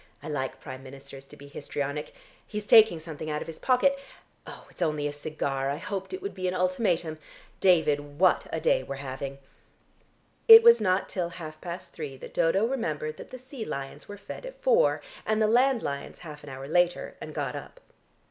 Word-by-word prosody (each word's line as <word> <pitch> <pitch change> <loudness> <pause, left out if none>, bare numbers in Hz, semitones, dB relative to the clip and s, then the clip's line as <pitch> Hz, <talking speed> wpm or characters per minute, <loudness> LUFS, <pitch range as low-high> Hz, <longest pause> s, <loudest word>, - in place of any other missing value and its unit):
I - - -6
like 135 -3 -3
Prime 130 -2 -8
Ministers 135 0 -11
to - - -15
be 140 - -12
histrionic. 145 +1 -4 0.3
He's 210 -1 -5
taking 220 -6 +7
something 155 -1 -7
out 150 0 -2
of - - -16
his 165 - -8
pocket. 275 +2 +3 0.7
It's - - -13
only 150 -2 0
a 145 - -4
cigar; 140 -2 -2
I 140 - -1
hoped 190 +3 -5
it 375 0 -6
would 400 - -4
be 185 0 -3
an 180 - -1
ultimatum. 180 -4 0 0.4
David, 145 -6 +2
what 185 +2 +3
a - - -1
day - - +2
we're - - -6
having!" 135 0 -6 1.1
It 450 0 +12
was 470 0 +7
not 185 0 +1
till 175 -3 -2
half 155 -3 -9
past 175 0 -7
three 145 -4 -6
that - - -10
Dodo 190 +6 +3
remembered 155 - -2
that - - -10
the 255 - -8
sea 255 -1 -8
lions 135 -8 -6
were 205 - -8
fed 200 - -9
at - - -9
four, - - +3 0.2
and 215 0 0
the 215 - +4
land 245 +3 +3
lions 140 0 -4
half 150 -2 -9
an 145 - -9
hour 135 +1 -7
later, 175 +3 +1
and - - -7
got - - -2
up. - - -9
165 Hz, 195 wpm, -27 LUFS, 145-215 Hz, 1.1 s, It